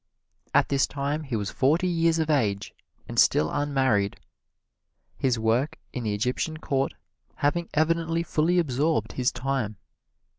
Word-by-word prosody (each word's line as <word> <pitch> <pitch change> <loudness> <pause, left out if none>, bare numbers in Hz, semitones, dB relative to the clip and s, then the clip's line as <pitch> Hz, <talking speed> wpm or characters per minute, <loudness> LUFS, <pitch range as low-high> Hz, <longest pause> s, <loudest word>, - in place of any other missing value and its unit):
At - - +4
this 140 -1 +2
time 145 +2 -2
he 130 -4 -3
was 100 -2 -2
forty 155 +7 +2
years 165 -1 +2
of 160 -1 0
age, 105 -9 0 0.3
and - - -1
still 75 0 +4
unmarried, 130 -9 +1 1.0
his 130 -3 +1
work 115 +6 +1 0.2
in 125 - -4
the 105 -1 0
Egyptian 125 +8 -1
Court 135 -3 -1 0.4
having 165 +4 0
evidently 165 +1 +1
fully 170 +2 +1
absorbed 145 -6 +1
his 125 -1 0
time. 130 -7 -2
140 Hz, 140 wpm, -26 LUFS, 120-160 Hz, 1.0 s, At